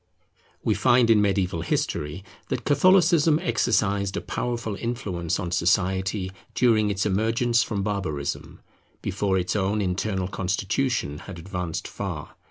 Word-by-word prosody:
We - - +2
find 120 -2 +4
in 105 -2 +5
mediaeval 95 -4 +1
history 75 +3 -2 0.2
that - - -3
Catholicism 165 0 +5
exercised 105 - +1
a - - -2
powerful 115 -4 -3
influence 100 -8 -3
on 90 -4 -3
society 95 +2 +1 0.2
during 110 -3 +3
its 100 -1 -1
emergence 115 +4 +2
from 100 -3 -2
barbarism, 90 -9 -3 0.4
before 100 0 0
its 90 +2 -1
own 100 +1 +1
internal 95 0 -1
constitution 100 - -1
had 95 - -9
advanced 90 -1 -4
far. - - -6
100 Hz, 125 wpm, -25 LUFS, 95-115 Hz, 0.4 s, in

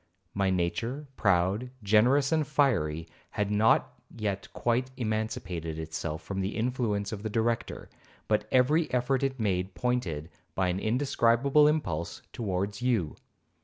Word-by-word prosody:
My 100 -1 +1
nature, 115 +11 -1
proud, 95 +4 +2
generous, 120 +7 +4
and 155 -3 +2
fiery, 90 - +1 0.2
had 105 0 -2
not 105 +2 +2
yet 105 -3 -4
quite 120 +2 0
emancipated 105 - -3
itself 80 0 -4
from 95 -1 -3
the 95 +3 -2
influence 110 -4 -1
of 105 -2 -5
the 110 - -3
Director, 115 +1 -1 0.4
but 105 -1 +1
every 150 +6 +3
effort 125 +1 +1
it 135 -1 -1
made 95 -3 -1
pointed, 90 -11 -2 0.2
by 95 -1 +1
an 90 +1 -1
indescribable 130 +4 +3
impulse, 90 - -1
towards 100 -1 -2
you. 115 -11 0
110 Hz, 130 wpm, -29 LUFS, 95-125 Hz, 0.4 s, generous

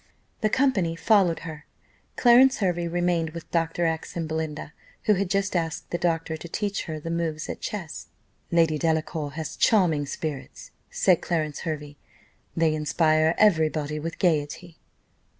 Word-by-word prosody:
The 215 - +1
company 205 -11 +1
followed 185 -2 +3
her 160 -2 -9 0.5
Clarence 255 +2 +6
Hervey 175 -4 0
remained 170 -2 0
with 170 - -9
Dr. 165 0 0
X 160 +1 -2
and 165 -2 -2
Belinda, 155 -1 -4 0.3
who 210 - +4
had 195 -1 -1
just 195 0 0
asked 165 -2 -2
the 175 - -1
doctor, 165 -2 0
to 165 +2 -9
teach 205 +2 -2
her 155 -2 -5
the 165 +2 -5
moves 165 -2 -2
at - - -6
chess. 190 -8 -5 0.4
"Lady 165 -3 +2
Delacour 160 -2 -1
has 160 0 -5
charming 165 -9 +3
spirits," 150 -1 -6 0.2
said 185 -3 +3
Clarence 155 -4 -2
Hervey; 150 -2 -5 0.6
"they 165 -1 +3
inspire 155 +1 +2
every 165 -7 +4
body 150 -1 -3
with 165 +2 -5
gaiety." 165 0 -1
165 Hz, 150 wpm, -25 LUFS, 155-175 Hz, 0.6 s, Clarence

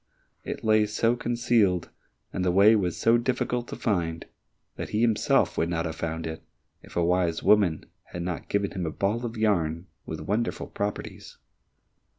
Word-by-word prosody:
It - - -6
lay 110 -1 +4
so 115 +3 +1
concealed, 115 -7 +1 0.4
and 90 - -1
the 90 - +2
way 100 +5 +6
was 90 -5 0
so 115 +1 +4
difficult 125 0 -1
to - - -6
find 85 -6 -1 0.5
that - - -5
he 105 - 0
himself 115 -3 +2
would 85 - +1
not 85 -1 -1
have 80 -1 -4
found 80 0 -4
it, 80 0 -5 0.4
if - - -15
a 85 - +2
wise 85 -2 +1
woman 95 -7 +3 0.2
had 85 - -6
not 90 -2 -4
given 100 -1 0
him 90 -3 -3
a - - -2
ball 105 +8 -1
of 115 0 -8
yarn 85 -6 +1 0.2
with - - -5
wonderful 110 +4 -1
properties. 100 0 -5
100 Hz, 170 wpm, -26 LUFS, 85-110 Hz, 0.5 s, way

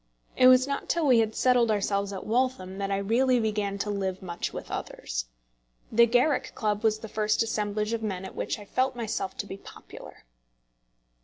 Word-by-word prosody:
It 255 - +6
was 255 0 +7
not 280 0 -4
till 335 -2 +1
we 250 -4 +5
had 220 -1 0
settled 245 -2 +3
ourselves 200 -1 0
at 195 - -6
Waltham 220 -5 -1
that 195 0 -2
I 195 - 0
really 240 +6 +2
began 210 -3 -1
to 205 +1 -2
live 190 -2 -3
much 170 -2 -4
with - - -8
others. - - -4 0.7
The 235 +1 +6
Garrick 250 +6 +2
Club 210 -1 -1
was 220 -1 +3
the 220 - -8
first 215 +1 +1
assemblage 210 0 -2
of 230 - -2
men 190 -4 -3
at - - -8
which - - -3
I 205 - -11
felt 255 +5 0
myself 220 -5 -3
to - - -3
be 195 - -7
popular. - - -13
215 Hz, 190 wpm, -27 LUFS, 200-240 Hz, 0.7 s, was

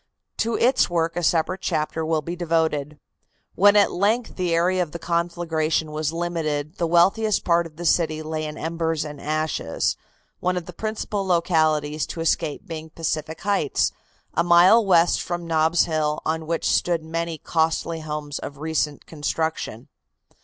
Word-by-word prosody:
To 230 0 0
its 255 +2 +3
work 165 -1 0
a 175 - -1
separate 175 +3 +1
chapter 160 -2 -1
will 160 -1 0
be 170 +4 -4
devoted. 160 -4 0 0.6
When 205 +2 +5
at 205 -1 +5
length 220 +6 0
the 180 -2 -1
area 180 +2 +2
of 165 -4 -3
the - - -3
conflagration 165 -2 -1
was 155 0 -1
limited 165 -3 -3
the 170 - +1
wealthiest 195 +6 +3
part 170 -1 +3
of 155 - -19
the 175 +2 -7
city 155 -2 +2
lay 155 0 -3
in 150 0 -6
embers 165 -1 -2
and 150 -2 -8
ashes, 155 - -1 0.4
one 180 0 0
of 175 - -4
the 180 - -9
principal 215 0 -3
localities 155 -4 +1
to - - -7
escape 165 -2 -1
being 160 -1 -7
Pacific 160 0 -3
Heights, 200 -9 +1 0.4
a 170 - +2
mile 175 +6 +6
west 175 -3 +4
from 175 -1 -4
Nob's 160 +1 +3
Hill, 155 -2 0
on 160 0 -2
which 165 0 -1
stood 170 -2 +1
many 165 0 -3
costly 165 +1 0
homes 150 -2 -5
of 140 - -7
recent 150 -1 -2
construction. 155 -5 -3
165 Hz, 160 wpm, -23 LUFS, 155-175 Hz, 0.6 s, mile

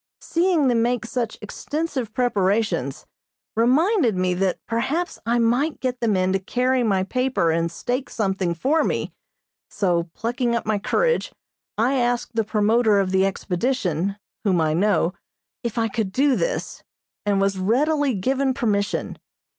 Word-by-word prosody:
Seeing 340 -4 +2
them 235 -2 +3
make 240 0 0
such 235 -1 -3
extensive 280 +1 -3
preparations 205 - 0 0.5
reminded 260 - +3
me 185 0 +1
that 185 0 0
perhaps 295 +10 -1
I 235 +1 +2
might 245 +7 +1
get 255 -1 -2
the 235 - 0
men 185 -3 +2
to 195 - +1
carry 250 +6 0
my 195 -5 +2
paper 250 -5 0
and 165 +1 0
stake 245 +8 -3
something 190 -5 -1
for 290 - +2
me, - - -2 0.6
so, 175 -4 0
plucking 240 +1 -1
up 235 - -2
my 215 -1 0
courage, 480 - +1 0.5
I 250 +5 +2
asked 245 0 0
the 225 -1 +1
promoter 215 +1 +2
of 190 -1 0
the 190 0 +3
expedition, 195 - -1 0.3
whom 190 -5 +2
I 155 -1 +2
know, 185 -1 +2 0.5
if 235 -1 -3
I 225 -1 +2
could 215 -2 -2
do 270 +5 +3
this, - - -2 0.4
and 205 -1 +1
was 195 -1 +1
readily 275 +6 +2
given 260 +6 0
permission. 205 -3 -1
230 Hz, 150 wpm, -23 LUFS, 195-255 Hz, 0.6 s, them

